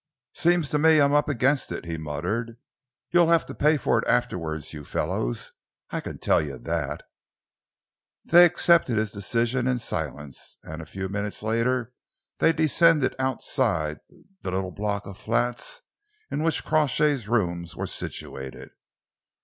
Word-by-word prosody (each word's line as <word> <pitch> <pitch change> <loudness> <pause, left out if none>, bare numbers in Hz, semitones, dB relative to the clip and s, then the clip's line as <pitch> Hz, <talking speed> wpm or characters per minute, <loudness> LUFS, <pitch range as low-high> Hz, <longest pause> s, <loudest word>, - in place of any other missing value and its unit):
"Seems 170 -3 +2
to 150 - +2
me 160 0 +5
I'm 140 0 +4
up 145 0 +3
against 135 +1 +1
it," - - -5
he 85 -1 -4
muttered. 90 +10 -3 0.5
"You'll 175 -1 +5
have 165 -1 +4
to - - -8
pay 150 +1 +3
for - - +1
it - - -4
afterwards, 85 -12 -1
you 75 -1 -8
fellows, - - -2 0.4
I - - -2
can - - -7
tell - - +2
you 70 -4 -5
that." - - -3 1.2
They 175 +2 +8
accepted 165 -8 +4
his 110 -1 0
decision 120 +5 0
in 130 -1 +1
silence, 75 - -5
and 80 +1 -7
a 80 - -10
few 95 +4 -5
minutes 100 +2 -3
later 115 +2 0 0.5
they 165 - +5
descended 160 -2 +3
outside 115 - 0 0.4
the - - -4
little 95 0 -2
block 100 +1 -2
of 100 0 -10
flats 120 - -1 0.5
in - - -1
which 165 0 0
Crawshay's 150 -5 +2
rooms 85 -7 -1
were - - -3
situated. 65 -1 -5
115 Hz, 150 wpm, -25 LUFS, 85-145 Hz, 1.2 s, They